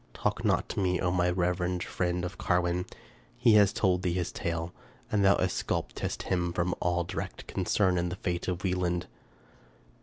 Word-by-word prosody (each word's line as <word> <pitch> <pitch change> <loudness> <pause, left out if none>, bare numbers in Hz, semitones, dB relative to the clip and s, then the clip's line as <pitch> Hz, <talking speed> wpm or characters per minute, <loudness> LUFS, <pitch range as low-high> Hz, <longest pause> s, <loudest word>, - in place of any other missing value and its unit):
Talk - - -1
not - - +2
to - - -3
me, 90 -2 +1
O 90 - +1
my 90 0 +2
reverend 90 0 0
friend! 90 0 -1
of 90 - -6
Carwin. 90 0 +1 0.5
He 115 - +5
has 105 -2 +6
told 90 -3 +1
thee 90 -2 0
his 90 -1 -1
tale, 85 0 -3 0.4
and 105 -2 +2
thou 100 +1 +6
exculpatest 95 -1 -2
him 85 -2 0
from 90 0 0
all 85 0 +1
direct - - -5
concern 95 -3 +1
in 85 0 -1
the 90 - -4
fate 90 -2 -3
of 90 0 -2
Wieland. 90 -1 0
90 Hz, 175 wpm, -29 LUFS, 85-90 Hz, 0.5 s, has